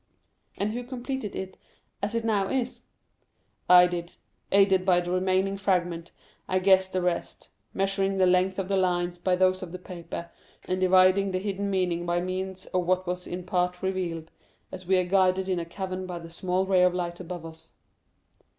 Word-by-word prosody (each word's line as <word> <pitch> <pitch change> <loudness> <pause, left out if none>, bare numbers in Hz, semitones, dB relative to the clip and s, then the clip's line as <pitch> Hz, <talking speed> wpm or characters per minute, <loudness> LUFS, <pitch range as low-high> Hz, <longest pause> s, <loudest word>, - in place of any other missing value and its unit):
"And 205 +2 -1
who 245 +2 -4
completed 250 -3 -5
it 190 0 -6 0.4
as 205 +3 -2
it 230 -1 -1
now 205 -4 +1
is?" 255 -2 -2 0.8
"I 180 0 +9
did. 175 -1 -4 0.4
Aided 195 -1 +4
by 185 -2 +4
the 175 0 -4
remaining 190 +1 +1
fragment, 175 -4 -1 0.4
I 185 - +1
guessed 190 0 +4
the 185 -1 -1
rest; 175 -1 -3 0.2
measuring 195 0 0
the 190 - +4
length 185 +1 +2
of 195 -2 -2
the 195 0 +1
lines 175 -1 0
by 180 +1 +1
those 185 +1 +2
of 180 -3 -7
the 180 - -6
paper, 170 -1 -8 0.3
and 185 0 -1
divining 185 +1 +5
the 185 - -1
hidden 200 +1 -2
meaning 180 -3 0
by 175 0 +1
means 185 +1 -4
of 180 -1 -2
what 185 0 +1
was 180 0 -4
in 180 +1 -5
part 180 0 -1
revealed, 175 -4 -3 0.4
as 185 -1 -9
we 190 0 +4
are 180 - +2
guided 185 0 +2
in 185 -2 0
a 170 - -4
cavern 185 +1 -5
by 180 -1 -5
the 165 -1 -10
small 185 +2 -1
ray 190 -1 +3
of 180 0 +4
light 175 -1 -3
above 175 -2 -7
us." 160 0 -12
185 Hz, 185 wpm, -27 LUFS, 180-190 Hz, 0.8 s, I